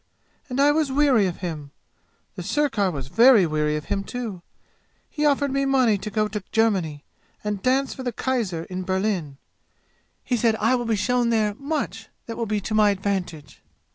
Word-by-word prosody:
And 250 +1 -3
I 285 +1 +5
was 300 -2 +1
weary 265 -7 +3
of 180 - -6
him. 150 -4 -5 0.7
The - - -6
sirkar 270 -10 0
was 140 -6 -5
very 230 - +6
weary 150 -1 0
of 150 - -4
him 200 -1 -2
too. 220 -5 -6 0.7
He 300 -1 +1
offered 285 -1 +1
me 275 +1 0
money 255 -6 +3
to 210 - -5
go 215 0 0
to 210 -2 -5
Germany 185 -10 +1 0.4
and 210 -2 -3
dance 265 +3 +1
for - - -8
the 250 -1 -2
kaiser 220 -9 -2
in 185 +1 -5
Berlin. 185 -6 -2 0.9
He 245 - 0
said 225 -1 +2
I 225 +3 +1
will 245 -1 0
be 225 -1 +1
shown 240 +4 +1
there 215 -2 +1
much 275 - -4 0.2
that 230 - -6
will 230 - -3
be 210 0 0
to 215 - -4
my 215 -1 +5
advantage. 190 -6 -3
215 Hz, 185 wpm, -24 LUFS, 185-255 Hz, 0.9 s, very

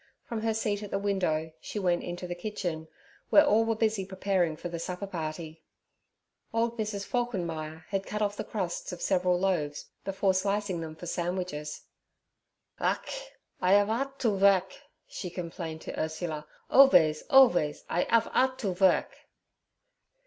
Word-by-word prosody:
From 230 -2 -4
her 225 0 0
seat 210 -2 -1
at 205 - -6
the 195 - -1
window 180 -6 0
she - - -6
went 180 -3 +1
into 175 +1 -5
the 175 - -3
kitchen, 175 -4 -4 0.4
where 300 - +7
all 225 -5 +4
were 225 0 +1
busy 220 -2 +1
preparing 185 -4 0
for 175 - -5
the 170 -1 -5
supperparty. 165 -3 -5 0.9
Old 230 +1 0
Mrs. 210 -2 -2
Falkenmeyer 165 -10 -3
had 195 -1 -2
cut 210 - -3
off 205 -1 0
the - - -4
crusts 185 -5 -3
of 180 - -7
several 180 -1 +2
loaves 165 -6 -1
before 195 0 +1
slicing 195 -1 0
them 160 -1 -6
for 170 - -9
sandwiches. 175 -3 -3 1.0
'Ach! - - -2 0.3
I'af'ardt 220 +9 +2
to 240 - +1
vurk' 195 -2 +3 0.3
she 180 - -6
complained 165 -2 -6
to - - -6
Ursula; 155 -1 -3 0.2
'alvays, 160 - +6
alvays 180 - +5
I 175 - +1
'af 230 -1 +4
'ardt 260 0 +2
to 195 -4 0
vurk.' 185 +1 +3
190 Hz, 150 wpm, -29 LUFS, 170-210 Hz, 1.0 s, where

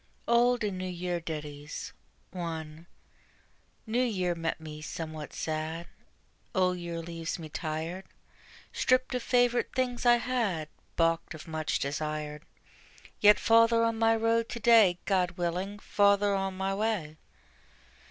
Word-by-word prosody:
OLD 240 0 +4
AND 200 -3 -2
NEW 185 - -3
YEAR 175 0 -2
DITTIES. 150 -2 -6 0.4
1. 165 -2 -6 1.0
New 235 +2 +1
Year 185 -7 0
met 165 -1 -3
me 155 -1 -8
somewhat 155 -1 -6
sad: 160 +2 -3 0.7
Old 180 -1 +2
Year 170 -1 -4
leaves 165 0 -4
me 160 -3 -8
tired, 160 +5 -4 0.7
Stripped 255 +1 +2
of 250 - -1
favorite 245 0 +2
things 250 -2 -1
I 240 -1 +7
had, 230 -11 -1 0.3
Balked 165 -1 +1
of 155 - -11
much 155 -1 -1
desired: 150 +1 -3 0.8
Yet 210 0 +7
farther 230 0 +5
on 230 -1 0
my 225 0 +4
road 230 +1 +1
to 235 - -5
day, 225 -6 +6
God 180 -3 +1
willing, 180 +4 -2
farther 200 0 +3
on 195 -1 -2
my 190 +1 -1
way. 195 -7 -1
180 Hz, 135 wpm, -29 LUFS, 160-225 Hz, 1.0 s, I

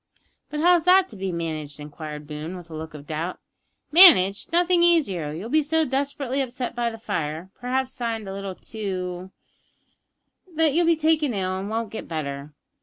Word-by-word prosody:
"But 300 0 -3
how's 350 0 +5
that 370 +1 +5
to - - -12
be 190 -1 -3
managed?" 155 -4 -5
inquired 150 0 -8
Boone, 155 +4 -6
with 170 -2 -12
a - - -6
look 155 0 -7
of 145 -1 -10
doubt. 160 +4 -4 0.5
"Managed? 285 - +7
Nothing 350 +1 +3
easier. 235 - +2
You'll 170 +8 -6
be 310 - +4
so 320 +2 +1
desperately 275 0 -1
upset 250 -1 -4
by 240 -1 0
the 225 - -8
fire 165 -4 -4
perhaps 260 +1 -2
singed 225 -3 -3
a 195 - -5
little 195 -1 -5
too 185 -4 -5 1.3
that 315 -2 +3
you'll 340 +2 +2
be 335 - +5
taken 310 -5 +1
ill 185 -1 -1
and 195 +2 -4
won't 225 -1 -3
get 225 - -7
better. 145 -2 -5
205 Hz, 180 wpm, -24 LUFS, -, 1.3 s, Managed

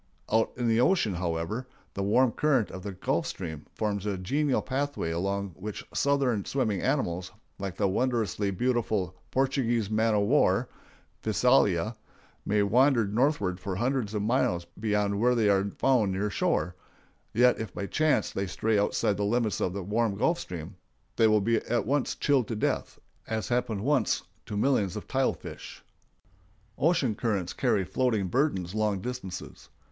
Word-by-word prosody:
Out 110 +1 +3
in 120 -1 0
the 115 +1 +3
ocean, 125 - +3
however, 85 +7 -3 0.3
the 100 - -3
warm 115 +5 +3
current 135 -4 +1
of 95 - -7
the 100 +1 -5
Gulf 90 - -1
Stream 80 -5 -6
forms 105 -2 -2
a 100 -2 -1
genial 135 +9 0
pathway 140 -10 -2
along 100 +4 -1
which 95 +4 -7
southern 135 -7 +1
swimming 110 -8 0
animals, 95 -11 -1 0.3
like 95 -3 -5
the 100 - +2
wondrously 110 -2 0
beautiful 110 -4 0
Portuguese 120 -5 0
man 110 0 +2
o' 105 - +3
war 115 -1 +3 0.5
(Physalia), 110 -3 +2 0.5
may 105 0 +3
wander 125 +2 +4
northward 105 -4 0
for 95 0 -4
hundreds 120 0 -1
of 105 - -1
miles 105 -7 +1
beyond 105 -2 0
where 125 +2 +3
they 110 -3 +3
are 100 0 +2
found 120 -8 +3
near 100 +2 -1
shore; 85 -2 0 0.6
yet 125 +2 +4
if 110 - -4
by 100 - -4
chance 155 +8 +1
they 100 0 -2
stray 110 +3 +1
outside 100 0 +1
the 105 - -1
limits 110 0 0
of 90 - +1
the 100 -1 -4
warm 105 +2 0
Gulf 170 +10 +1
Stream, 90 - -7 0.4
they 115 - +5
will 105 -2 +3 0.2
at 120 +1 +1
once 140 +3 0
be - - -29
chilled 135 -5 +3
to 115 - -3
death, 105 - -1 0.3
as 110 -1 -3
happened 120 -4 0
once 135 -1 +1 0.2
to 105 - -4
millions 105 -6 +1
of - - -6
tile - - +1
fish. - - -10 0.9
Ocean 145 -6 +2
currents 100 -5 -2
carry 100 - +1
floating 110 -2 0
burdens 100 - 0
long 105 -2 0
distances. 95 -4 -7
110 Hz, 160 wpm, -28 LUFS, 100-125 Hz, 0.9 s, they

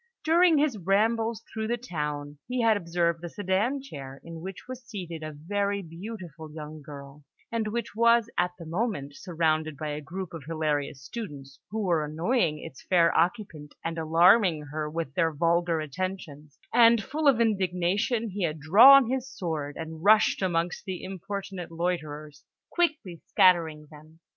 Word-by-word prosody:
During 335 0 +5
his 285 -7 +1
rambles 220 +4 +1
through 220 -1 -3
the 240 +1 0
town, 150 - -5
he 250 0 -1
had 225 -1 +4
observed 170 -2 -1
a 175 - -5
sedan 205 +9 -1
chair 135 - -9
in 165 -1 -9
which 190 +5 -8
was 255 -1 -8
seated 180 -8 -7
a 155 0 -5
very 200 +6 -2
beautiful 170 -3 -9
young 155 0 -8
girl, 140 0 -11 0.3
and 230 -2 -1
which 230 0 -3
was 235 0 +4
at 180 0 +2
the 170 - -10
moment 165 - -3
surrounded 155 -3 -1
by 155 +1 -4
a 150 +1 -4
group 180 +5 -7
of 165 -3 -7
hilarious 150 -4 -2
students, 140 - -8
who 220 +1 -3
were 170 -5 +1
annoying 160 - 0
its 135 - -10
fair 170 -2 +3
occupant, 170 -5 -1
and 165 0 -3
alarming 170 +1 +4
her 155 0 -3
with 160 -3 -4
their 165 0 +1
vulgar 170 +2 +1
attentions; 155 -2 -6 0.2
and, 230 -2 +6
full 300 +6 -1
of 265 -5 +5
indignation, 205 +2 0
he 200 +2 -5
had 160 -3 -1
drawn 235 - +8
his 260 +1 -2
sword, 160 - -4
and 160 0 -7
rushed 215 +1 +5
amongst 175 -2 -1
the 185 -3 -5
importunate 190 -1 -6
loiterers, 155 -4 -4 0.3
quickly 305 - -1
scattering 160 -4 +3
them. 155 +2 -16
175 Hz, 160 wpm, -27 LUFS, 155-215 Hz, 0.3 s, drawn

